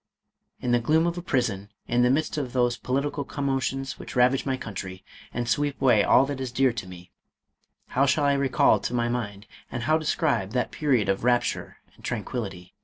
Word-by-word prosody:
In 125 - -2
the 120 - +4
gloom 155 +7 +2
of 170 0 0
a - - -6
prison, 115 - -1 0.2
in 120 0 +2
the 125 - +4
midst 155 +5 +1
of 140 -5 -3
those 120 -2 +2
political 140 +4 -2
com 140 +1 -5
motions 135 0 -2
which - - -9
ravage 125 +2 +3
my 130 -1 0
country, 95 -5 -7 0.3
and 120 0 -3
sweep 145 +5 0
away 120 -6 +4
all 130 - +5
that 140 -1 -4
is 130 -2 -3
dear 130 0 +2
to 105 -5 -6
me, 90 -1 -12 0.8
how 135 +2 +2
shall 145 +1 +2
I 140 - +4
recall 140 -1 +3
to 125 - -3
my 120 -1 +1
mind, 105 -4 -4 0.3
and 120 - -3
how 155 +5 +3
describe, 150 -10 0
that 125 -1 0
period 130 -8 +1
of 95 +1 0
rapture 120 0 0 0.2
and - - -21
tranquillity? 100 -6 -5
125 Hz, 200 wpm, -26 LUFS, 115-140 Hz, 0.8 s, all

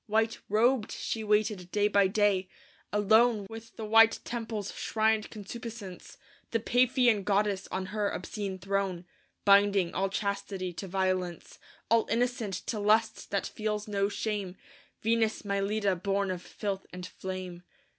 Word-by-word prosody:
White 220 +1 +1
robed 225 +2 +2
she 225 - -3
waited 210 -3 +1
day 205 0 +3
by 200 -2 +4
day; 195 -2 +2 0.4
alone 215 +1 +4
With 225 0 -10
the 220 - -5
white 225 +1 +6
temple's 225 -4 -4
shrined 220 -1 +1
concupiscence, 215 -3 -8 0.3
The 230 - 0
Paphian 245 -2 +3
goddess 200 -1 +1
on 190 0 -2
her 210 -2 +1
obscene 200 -3 -4
throne, 190 -2 -2 0.4
Binding 200 -3 +5
all 195 +1 0
chastity 195 -2 -3
to 195 - -6
violence, 185 -2 -2 0.3
All 230 -1 +4
innocent 230 -3 0
to 220 - -2
lust 215 +2 +2
that 200 - -1
feels 210 -1 -3
no 200 -1 0
shame 205 -3 -3 0.5
Venus 225 0 +1
Mylitta 200 -2 0
born 200 -1 0
of 180 -1 -4
filth 195 +1 -5
and 180 0 -7
flame. 185 -1 -6
205 Hz, 135 wpm, -29 LUFS, 195-220 Hz, 0.5 s, white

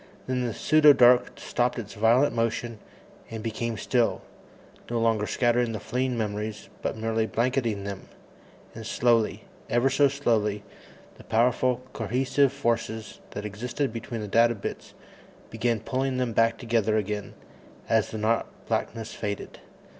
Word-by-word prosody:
Then 130 -1 -1
the - - -2
pseudo 155 -1 +6
dark 125 -1 +5
stopped 125 +1 -1
its 110 -4 -6
violent 115 +6 +3
motion 115 -1 -2 0.5
and 110 -1 -6
became 115 0 -3
still, 120 +1 0 0.7
no 120 -1 0
longer 110 -2 +1
scattering 120 -1 +1
the 110 - -3
fleeing 125 +2 -1
memories, 105 0 -4
but - - -2
merely 110 0 0
blanketing 120 -4 0
them. 100 -1 -6 0.7
And 115 - -8
slowly 115 0 +1 0.3
ever 120 +3 +2
so 140 +1 +5
slowly 110 -7 0 0.6
the - - -12
powerful 125 +2 +1
cohesive 130 +5 +1
forces 115 -4 -2
that 105 - -5
existed 120 +5 -3
between 115 0 -5
the 105 - -4
data 115 +3 +4
bits 100 - -7 0.6
began 115 0 0
pulling 130 +3 -1
them 125 -2 -1
back 115 +1 +3
together 110 -2 +1
again 105 0 -3 0.5
as 110 -2 +2
the 110 - -5
not 110 +2 +1 0.2
blackness 115 -1 -3
faded. 100 -1 -5
115 Hz, 140 wpm, -26 LUFS, 110-125 Hz, 0.7 s, pseudo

